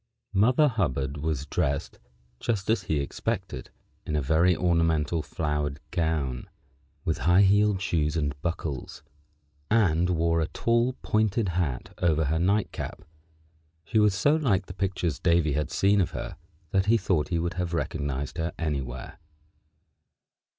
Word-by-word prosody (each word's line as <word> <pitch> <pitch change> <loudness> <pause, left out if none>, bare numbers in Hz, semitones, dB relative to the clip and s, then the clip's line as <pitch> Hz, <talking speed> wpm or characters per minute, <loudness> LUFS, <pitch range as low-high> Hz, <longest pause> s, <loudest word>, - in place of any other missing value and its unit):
Mother 125 +9 +4
Hubbard 75 - -1
was 75 -2 -2
dressed, - - -2 0.4
just 110 -3 -1
as 110 -4 +2
he 75 - 0
expected, 70 - -3 0.3
in 75 - -3
a - - +2
very 80 +6 +3
ornamental 85 -2 +1
flowered 75 -1 -2
gown, 80 -8 -1 0.6
with 80 - 0
high 90 +3 +6
heeled 105 0 +4
shoes 80 -4 0
and 75 -3 0
buckles, 80 -6 -4 0.7
and 90 -6 +3
wore 85 -1 +2
a 80 - 0
tall 120 +2 +1
pointed 110 -1 +1
hat 85 -8 -2
over 80 -3 +2
her 80 +3 0
nightcap. 100 +5 -1 0.8
She 110 - +1
was 105 -2 +4
so 145 +9 +3
like 110 -12 +1
the 90 - -8
pictures 90 -5 -2
Davy 85 -4 +2
had 75 +1 -1
seen 100 +3 +3
of 90 - 0
her - - -5 0.4
that 95 0 +2
he 115 +2 +5
thought 90 -8 0
he 85 - -1
would 85 +1 -1
have 90 -1 -2
recognized 70 -4 -3
her 80 +1 -2
anywhere. 70 -3 -4
85 Hz, 145 wpm, -27 LUFS, 75-100 Hz, 0.8 s, high